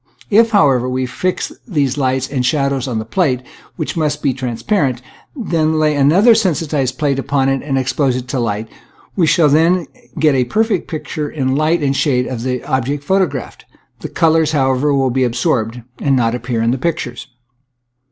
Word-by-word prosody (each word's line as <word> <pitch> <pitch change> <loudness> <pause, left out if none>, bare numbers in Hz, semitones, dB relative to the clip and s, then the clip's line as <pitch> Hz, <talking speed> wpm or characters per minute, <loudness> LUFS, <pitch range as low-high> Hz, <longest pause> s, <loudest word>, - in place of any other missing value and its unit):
If, 225 +3 +5
however, 135 - +3
we 130 0 -1
fix 180 +9 -2 0.2
these 145 - 0
lights 130 -2 0
and 130 -3 -2
shadows 140 -1 0
on 120 -3 -2
the 110 - -3
plate, 130 -1 0 0.3
which - - -4
must 150 -2 -1
be 135 - +2
trans 125 -3 -5
parent, 140 - +1 0.4
and 240 -10 -6
then 160 -1 +2
lay 155 -1 +2
another 170 - +5
sensitized 155 - 0
plate 145 -3 0
upon 135 0 0
it 135 0 0
and 140 -2 -2
expose 130 0 0
it 125 0 -5
to 135 - -2
the - - 0
light, 110 -1 -2 0.5
we 175 -5 +2
shall 160 -1 +4
then 165 +4 +3 0.3
get 150 -1 +3
a 130 -2 +2
perfect 215 - 0
picture 155 -2 -4
in 130 -3 -1
light 155 +2 +1
and 140 -1 +1
shade 125 -4 +1
of 125 -3 -5
the 125 0 -3
object 135 +3 -2
photographed. 160 -6 -1 0.3
The - - -6
colors, 160 -1 +2
how 135 -3 +2
ever, 140 +3 0
will 135 -2 +1
be 130 +1 +1
absorbed 120 -1 -1 0.2
and 140 -2 +1
not 115 -2 +1
appear 120 -1 -2
in 115 - +2
the 130 - -2
pictures. 130 -5 -3
140 Hz, 190 wpm, -17 LUFS, 125-155 Hz, 0.5 s, If